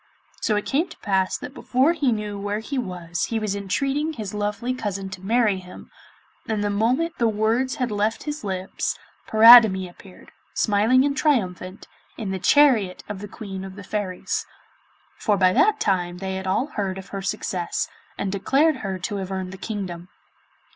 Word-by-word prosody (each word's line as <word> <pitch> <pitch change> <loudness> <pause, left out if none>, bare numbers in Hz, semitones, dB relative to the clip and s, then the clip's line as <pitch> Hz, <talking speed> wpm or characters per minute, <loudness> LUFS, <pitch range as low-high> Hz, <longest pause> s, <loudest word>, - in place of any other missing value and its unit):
So 215 - +1
it 210 - -1
came 315 +6 +1
to - - -12
pass 190 -2 0
that 265 - -8
before 270 +3 +2
he 285 -7 +1
knew 210 -2 -3
where 205 +1 -2
he 260 +5 -3
was 175 -6 -3
he 230 - -2
was 215 -2 -1
entreating 275 +10 -1
his 215 -7 -6
lovely 210 +4 -2
cousin 200 -5 -4
to 190 -1 -8
marry 215 -1 +2
him, 180 0 -12 0.6
and 215 -2 -1
the 205 - 0
moment 250 +11 0
the 235 - +3
words 225 +4 +1
had 250 -3 -2
left 210 +2 -1
his 295 -3 -5
lips, 190 -2 -3 0.3
Paridamie 220 -4 +8
appeared, 180 +1 -16 0.2
smiling 220 +6 +3
and 280 -1 0
triumphant, 195 - -1 0.3
in 210 -5 -4
the 190 - -3
chariot 225 -6 +4
of 205 -2 -5
the 205 - -7
Queen 195 -3 -7
of 190 -1 -8
the 200 - -9
Fairies, 190 -1 -3 0.7
for 210 -3 +2
by 185 -1 +4
that 430 - +3
time 180 - 0
they 190 +1 -4
had 190 0 -4
all 195 +7 +1
heard 200 -10 -3
of 190 0 -9
her 195 - -5
success, 185 -2 -2 0.3
and 195 - -2
declared 275 +10 +2
her 195 -4 -4
to 195 +3 -4
have 190 -1 -5
earned 190 -1 -3
the - - -8
kingdom. 185 -4 -5
205 Hz, 180 wpm, -23 LUFS, 190-245 Hz, 0.7 s, Paridamie